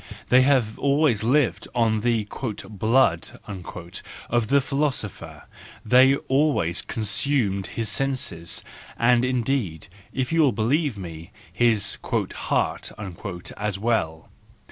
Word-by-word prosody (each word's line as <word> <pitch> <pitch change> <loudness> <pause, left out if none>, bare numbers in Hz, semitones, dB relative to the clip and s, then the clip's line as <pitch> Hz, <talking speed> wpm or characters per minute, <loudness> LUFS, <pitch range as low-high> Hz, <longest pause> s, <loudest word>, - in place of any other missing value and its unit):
They 125 +1 +6
have 130 -5 +2
always 140 -6 +2
lived 130 +2 +1
on 115 -2 +2
the 115 -1 +1
" 105 +1 -6
blood 110 -4 +1
" - - -29 0.8
of 120 -2 +2
the 140 +4 +4
philosopher, 135 -7 -3 0.4
they 130 +4 +6
always 135 - +1
consumed 110 -3 0
his 115 -1 -2
senses, 125 -13 -2 0.3
and 120 +1 +4
indeed, 120 - -1 0.2
if 130 +1 -2
you 165 - +4
will 140 -6 +4
believe 125 +4 0
me, 85 -3 -8 0.2
his 110 -4 +2 0.3
" - - -13
heart - - -1 0.3
" 90 -3 -7
as 100 -2 -2
well. 95 -8 -1
115 Hz, 120 wpm, -24 LUFS, 105-135 Hz, 0.8 s, They